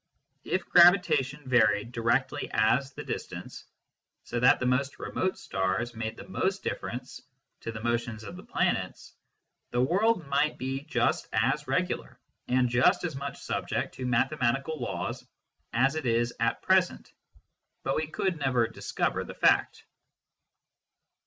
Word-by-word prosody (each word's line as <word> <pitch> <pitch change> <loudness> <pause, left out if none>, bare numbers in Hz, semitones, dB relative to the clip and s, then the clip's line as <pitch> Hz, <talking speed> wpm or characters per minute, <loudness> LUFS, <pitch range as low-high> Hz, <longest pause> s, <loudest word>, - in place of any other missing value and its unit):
If 185 - -1
gravitation 160 -6 +5
varied 110 -3 +3
directly 120 +3 0
as 125 +5 +2
the - - -7
distance, - - -6 0.6
so 120 - -3
that 125 - +5
the 125 - -1
most 130 +2 0
remote 185 0 -2
stars 95 +6 -2
made 110 -1 -4
the - - -10
most 190 +1 -1
difference 125 +1 -5 0.4
to 115 - -5
the 110 -1 -8
motions 120 -1 -1
of 100 - -8
the - - -9
planets, - - -2 0.6
the 120 - -1
world 185 - +2
might 140 +2 +1
be 135 +2 -3
just - - 0
as - - +1
regular - - -2 0.3
and 125 0 +3
just 120 +7 +3
as 165 -5 -3
much 140 +1 -6
subject - - -2
to 130 - -5
mathematical 135 +4 0
laws 120 - -4 0.5
as 135 +4 +2
it 155 -4 -3
is 120 +1 +1
at 115 0 0
present, 185 -1 +1 0.7
but 135 - 0
we 155 0 -1
could 170 +2 -2
never 125 -5 +2
discover 115 - -2
the - - -9
fact. - - +2
130 Hz, 140 wpm, -28 LUFS, 120-150 Hz, 0.7 s, gravitation